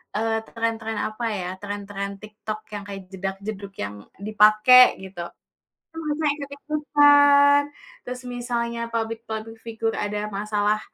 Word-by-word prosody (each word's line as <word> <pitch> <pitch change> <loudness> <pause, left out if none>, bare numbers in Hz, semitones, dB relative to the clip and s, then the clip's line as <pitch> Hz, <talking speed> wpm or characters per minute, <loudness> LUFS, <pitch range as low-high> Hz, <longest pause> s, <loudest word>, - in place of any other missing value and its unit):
eee, 225 +1 +1
tren-tren, 225 -1 -3
apa 215 +2 -5
ya, 180 - -4
tren-tren 200 -1 -5
TikTok 215 0 -6 0.2
yang 205 - -5
kayak 195 -1 -6
jedag-jedug 195 +1 -5
yang 100 +1 -5 0.3
dipake, 215 +4 +6
gitu. 185 -2 -7 0.6
Itu 325 - -16 0.2
mereka 310 - +1 0.2
ikut-ikutan, 285 0 +5 0.4
terus 250 0 -6
misalnya 235 -1 -2
publik-publik 225 0 -4
figur 225 0 -2
ada 210 0 -2
masalah, 210 +1 0
220 Hz, 115 wpm, -24 LUFS, 205-245 Hz, 0.6 s, dipake